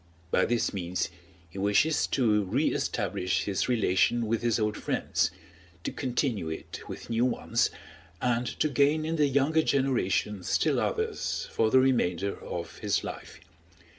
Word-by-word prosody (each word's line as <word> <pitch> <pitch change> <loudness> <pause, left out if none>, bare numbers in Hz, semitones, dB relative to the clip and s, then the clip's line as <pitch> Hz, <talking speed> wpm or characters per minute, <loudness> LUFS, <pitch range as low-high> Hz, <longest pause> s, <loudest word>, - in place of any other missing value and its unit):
By - - +3
this 120 0 0
means 90 -2 -2 0.4
he 90 +4 -9
wishes 105 +10 +2
to 110 -5 +2
re 130 +11 +1
establish 90 0 -1
his 100 +4 -1
relation 115 0 +2
with 115 +1 0
his 120 -1 +1
old 105 -1 0
friends, - - 0 0.5
to - - -2
continue 125 - -1
it 80 - -6
with - - -8
new 115 +1 +2
ones, 125 - +1 0.5
and 120 0 0
to 155 - +3
gain 145 +3 +2
in 165 +1 -1
the 150 -1 +4
younger 140 +4 +3
generation 125 -8 +1
still 90 - +1
others - - -2
for 110 - +2
the 130 - +5
remainder 100 -8 +1
of 85 -1 -6
his 105 -2 0
life. - - -8
115 Hz, 150 wpm, -28 LUFS, 100-135 Hz, 0.5 s, the